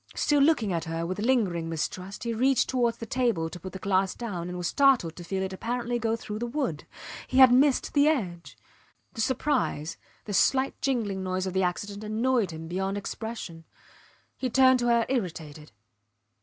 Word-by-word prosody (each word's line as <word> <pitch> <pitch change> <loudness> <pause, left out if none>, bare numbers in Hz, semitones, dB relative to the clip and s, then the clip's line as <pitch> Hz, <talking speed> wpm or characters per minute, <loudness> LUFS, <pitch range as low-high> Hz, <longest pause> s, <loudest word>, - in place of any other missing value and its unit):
Still 290 -1 +2
looking 275 - +3
at 165 0 -2
her 165 +1 -3
with 185 +3 -4
lingering 205 -9 +1
mistrust 180 +4 -4
he 235 -1 -2
reached 260 +3 +2
towards 240 -3 0
the 230 - -6
table 225 -10 0
to 175 - -8
put 185 +2 -8
the - - -7
glass 190 -1 0
down 180 -7 -5
and 180 - -5
was 175 - -4
startled 260 - +3
to 175 - -9
feel 190 +2 -2
it 190 0 -4
apparently 240 +4 -2
go 225 -1 0
through 215 -2 -6
the 240 - -2
wood. 240 - -3 0.4
He 260 - -2
had 260 -2 +9
missed 265 +2 +3
the 285 0 +4
edge. 185 - -2 0.6
The 225 - -3
surprise, 250 - -1 0.3
the 205 - -5
slight 265 +6 +2
jingling 220 -8 -1
noise 185 0 -2
of 185 - -3
the 190 - +1
accident 200 +3 -3
annoyed 225 0 +1
him 160 0 -7
beyond 190 +3 -2
expression. 205 -5 -6 0.7
He 255 - -3
turned 260 +1 +5
to 240 - 0
her 235 -1 +3
irritated. 160 - -4
210 Hz, 185 wpm, -27 LUFS, 180-250 Hz, 0.7 s, had